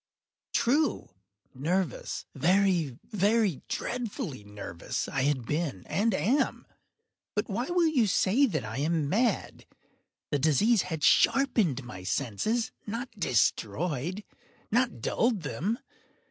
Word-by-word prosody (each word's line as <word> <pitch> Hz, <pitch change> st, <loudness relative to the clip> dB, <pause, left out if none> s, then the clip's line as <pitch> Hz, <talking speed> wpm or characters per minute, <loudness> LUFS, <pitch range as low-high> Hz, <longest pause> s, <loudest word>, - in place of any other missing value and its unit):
True!—nervous—very, 165 Hz, -, 0 dB
very 205 Hz, -, +1 dB
dreadfully 210 Hz, -, -4 dB
nervous 100 Hz, -5 st, -5 dB
I 135 Hz, -, -1 dB
had 135 Hz, -3 st, +1 dB
been 150 Hz, -, -2 dB
and 215 Hz, 0 st, +1 dB
am; 265 Hz, +9 st, +1 dB, 0.7 s
but 210 Hz, +1 st, 0 dB
why 230 Hz, +4 st, -2 dB
will 350 Hz, +1 st, +2 dB
you 270 Hz, -9 st, +3 dB
say 215 Hz, +8 st, +3 dB
that 155 Hz, -, -2 dB
I 110 Hz, +4 st, -5 dB
am 155 Hz, 0 st, +1 dB
mad? 230 Hz, +8 st, 0 dB, 0.6 s
The 145 Hz, -, +1 dB
disease 170 Hz, -, +4 dB
had 160 Hz, -4 st, -4 dB
sharpened 215 Hz, -, +3 dB
my 105 Hz, -7 st, -9 dB
senses—not 215 Hz, -, -2 dB
destroyed—not 165 Hz, -, -1 dB
dulled 220 Hz, -, +1 dB
them. 195 Hz, +10 st, -2 dB
180 Hz, 100 wpm, -29 LUFS, -, 0.7 s, disease